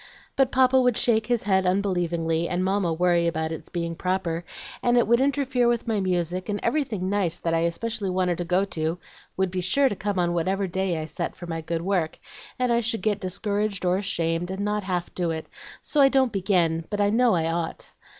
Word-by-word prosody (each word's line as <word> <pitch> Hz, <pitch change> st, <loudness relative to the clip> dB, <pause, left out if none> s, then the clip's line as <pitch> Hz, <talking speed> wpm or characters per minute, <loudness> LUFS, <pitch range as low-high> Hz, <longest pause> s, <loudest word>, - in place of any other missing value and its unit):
But 270 Hz, -1 st, +2 dB
Papa 260 Hz, 0 st, +4 dB
would 250 Hz, -3 st, +2 dB
shake 225 Hz, -2 st, +2 dB
his 240 Hz, -2 st, +1 dB
head 190 Hz, -1 st, +2 dB
unbelievingly, 175 Hz, -3 st, 0 dB
and 180 Hz, +1 st, 0 dB
Mamma 190 Hz, -2 st, +1 dB
worry 170 Hz, +1 st, +2 dB
about 160 Hz, -1 st, -1 dB
its 160 Hz, -, -7 dB
being 170 Hz, -1 st, -3 dB
proper, 180 Hz, -2 st, -2 dB, 0.4 s
and 245 Hz, 0 st, +3 dB
it 240 Hz, -, +4 dB
would 235 Hz, +2 st, +3 dB
interfere 265 Hz, -3 st, +1 dB
with 235 Hz, 0 st, 0 dB
my 220 Hz, -2 st, +1 dB
music, 180 Hz, 0 st, -1 dB
and 205 Hz, 0 st, -1 dB
everything 230 Hz, -11 st, -1 dB
nice 190 Hz, -4 st, 0 dB
that 165 Hz, -, -2 dB
I 165 Hz, -, +2 dB
especially 200 Hz, +5 st, -2 dB
wanted 180 Hz, -2 st, 0 dB
to -, -, 0 dB
go 180 Hz, +3 st, +1 dB
to 160 Hz, -2 st, -2 dB, 0.4 s
would 190 Hz, -1 st, +1 dB
be 185 Hz, 0 st, -2 dB
sure 270 Hz, +10 st, +3 dB
to 205 Hz, -, -3 dB
come 205 Hz, 0 st, -3 dB
on 175 Hz, -1 st, +1 dB
whatever 190 Hz, +4 st, 0 dB
day 190 Hz, -1 st, -1 dB
I 155 Hz, -, -3 dB
set 170 Hz, +2 st, -4 dB
for 175 Hz, -, -9 dB
my 165 Hz, -1 st, -4 dB
good 165 Hz, +1 st, -3 dB
work, 180 Hz, -4 st, 0 dB, 0.4 s
and 250 Hz, -1 st, +1 dB
I 235 Hz, -, +2 dB
should 225 Hz, -4 st, -2 dB
get 210 Hz, -2 st, +1 dB
discouraged 200 Hz, 0 st, -2 dB
or 180 Hz, 0 st, +3 dB
ashamed, 170 Hz, -3 st, -1 dB
and 190 Hz, +1 st, -4 dB
not 210 Hz, -1 st, -1 dB
half 180 Hz, -2 st, -2 dB
do 175 Hz, -2 st, -1 dB
it, 160 Hz, -1 st, -3 dB, 0.4 s
so 295 Hz, -, +1 dB
I 270 Hz, -, +7 dB
don't 265 Hz, -3 st, +3 dB
begin, 175 Hz, -4 st, +1 dB
but 205 Hz, -, -3 dB
I 205 Hz, 0 st, +3 dB
know 235 Hz, -1 st, +4 dB
I 165 Hz, -2 st, +1 dB
ought." 165 Hz, -1 st, -4 dB
185 Hz, 220 wpm, -25 LUFS, 170-215 Hz, 0.4 s, I